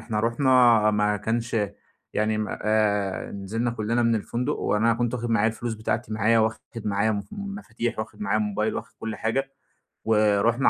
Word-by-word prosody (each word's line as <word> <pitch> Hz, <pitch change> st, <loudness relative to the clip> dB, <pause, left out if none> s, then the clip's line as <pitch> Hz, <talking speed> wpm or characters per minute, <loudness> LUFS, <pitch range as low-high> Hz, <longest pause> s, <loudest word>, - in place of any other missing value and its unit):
إحنا 110 Hz, -2 st, -2 dB
رُحنا 120 Hz, -2 st, +4 dB
ما 105 Hz, 0 st, +1 dB
كانش 115 Hz, +3 st, -2 dB, 0.6 s
يعني 110 Hz, 0 st, +1 dB
م 105 Hz, -, -1 dB
أ 105 Hz, -3 st, 0 dB
نزلنا 110 Hz, +5 st, -2 dB
كُلّنا 115 Hz, +1 st, 0 dB
من 115 Hz, 0 st, +3 dB
الفندق 120 Hz, +6 st, -1 dB
وأنا 115 Hz, +2 st, +2 dB
كنت 120 Hz, +1 st, -1 dB
واخد 120 Hz, -1 st, -3 dB
معايا 110 Hz, -1 st, +3 dB
الفلوس 115 Hz, +1 st, -4 dB
بتاعتي 110 Hz, +1 st, -2 dB
معايا 110 Hz, +2 st, +3 dB
واخد 110 Hz, 0 st, +1 dB, 0.3 s
معايا 105 Hz, +1 st, +1 dB
م 100 Hz, -1 st, -3 dB
مفاتيح، 200 Hz, -, -4 dB
واخد 110 Hz, -1 st, -6 dB
معايا 105 Hz, +1 st, +1 dB
موبايل، 105 Hz, +1 st, -1 dB
واخد -, -, -6 dB
كل 110 Hz, -1 st, -4 dB
حاجة. 135 Hz, +6 st, -1 dB, 0.5 s
ورُحنا 110 Hz, +3 st, +3 dB
110 Hz, 165 wpm, -25 LUFS, 105-115 Hz, 0.6 s, رُحنا